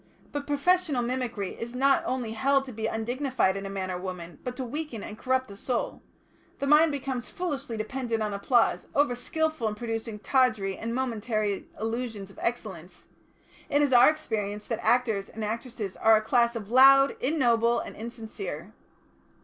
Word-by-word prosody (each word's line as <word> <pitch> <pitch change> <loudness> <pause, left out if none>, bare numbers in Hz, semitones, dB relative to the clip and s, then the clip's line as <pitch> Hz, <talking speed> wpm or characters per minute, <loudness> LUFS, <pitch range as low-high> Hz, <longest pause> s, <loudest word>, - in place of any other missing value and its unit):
But 290 -1 -4
professional 290 -2 +2
mimicry 240 -5 -2
is 235 +1 -7
not 275 +1 +4
only 250 -3 -2
held 270 +4 +2
to 260 - -8
be 220 -1 -3
undignified 240 -2 0
in 195 0 -4
a - - -6
man 190 -1 -3
or 180 - -3
woman, 180 -2 -7
but 250 0 -4
to 265 - -2
weaken 255 -3 -5
and 210 - -7
corrupt 260 +2 0
the 200 - -10
soul; 240 +4 -3 0.6
the 280 - -2
mind 300 +3 +6
becomes 265 -3 -4
foolishly 280 -9 -4
dependent 230 0 -2
on 210 -1 -2
applause, 225 +4 +2
over 285 -3 +3
skilful 315 0 -1
in 210 - -2
producing 225 -1 -4
tawdry 220 -5 +1
and 230 +3 -4
momentary 220 -5 -1
illusions 225 -3 -4
of - - -15
excellence; 190 -7 -5 0.6
it 290 +1 +3
is 280 -3 +2
our 245 +3 +8
experience 210 -9 -3
that 230 -2 -3
actors 225 -5 +2
and 220 -1 -5
actresses 225 -2 -4
as 220 0 +5
a - - 0
class 235 +1 +2
are 230 - -2
loud, 270 +5 +6
ignoble, 240 -5 +2
and - - -7
insincere. 230 - -7
235 Hz, 170 wpm, -27 LUFS, 215-265 Hz, 0.6 s, our